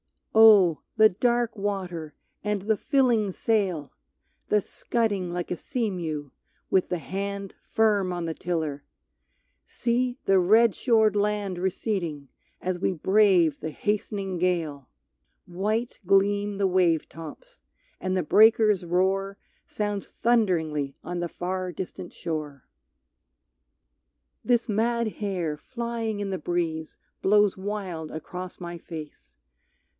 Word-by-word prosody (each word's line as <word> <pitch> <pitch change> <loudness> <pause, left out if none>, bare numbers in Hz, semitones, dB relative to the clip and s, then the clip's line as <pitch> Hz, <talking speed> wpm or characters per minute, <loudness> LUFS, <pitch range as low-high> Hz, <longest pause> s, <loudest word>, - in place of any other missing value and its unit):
Oh! 210 -7 +7 0.2
the 220 0 +7
dark 240 +3 0
water, 185 -6 -4 0.3
and 210 -2 -1
the 215 +1 +1
filling 240 -8 +2
sail! 185 - 0 0.6
The 210 - +3
scudding 205 -4 -1
like 175 0 -4
a 180 - -1
sea 235 - -2
mew, 155 -6 -4 0.4
with 190 - +2
the 180 - 0
hand 200 +4 -4
Firm 205 -4 +1
on 175 -1 -3
the 165 - -2
tiller! 155 -5 -3 0.8
See, 245 +1 -1
the 195 -1 +5
red 220 +4 +5
shored 220 -4 +3
land 205 -3 0
Receding, 175 - -2 0.3
as 185 -1 -2
we 190 - +1
brave 180 -3 +3
the 160 - -4
hastening 195 0 -2
gale! 165 -7 -1 0.6
White 215 +7 -2
gleam 200 +1 +2
the 195 -1 +2
wave 180 -4 +2
tops, - - -11 0.4
and 185 0 -1
the 180 - +1
breakers' 215 +1 +5
roar 190 +3 0 0.3
Sounds 205 -2 -3
thunderingly 160 - +1
on 175 0 -4
the 175 0 -2
far 185 +1 -3
distant 175 +1 -7
shore. 150 -5 -5 1.8
This 240 -1 +2
mad 230 +2 +1
hair 180 -7 -2
flying 235 0 -4
in 200 -1 -3
the 190 - -2
breeze 160 -1 -2 0.2
blows 205 0 +4
wild 190 -5 -4
Across 180 +3 -7
my 175 -1 -6
face. 155 -3 -10
190 Hz, 120 wpm, -26 LUFS, 175-215 Hz, 1.8 s, Oh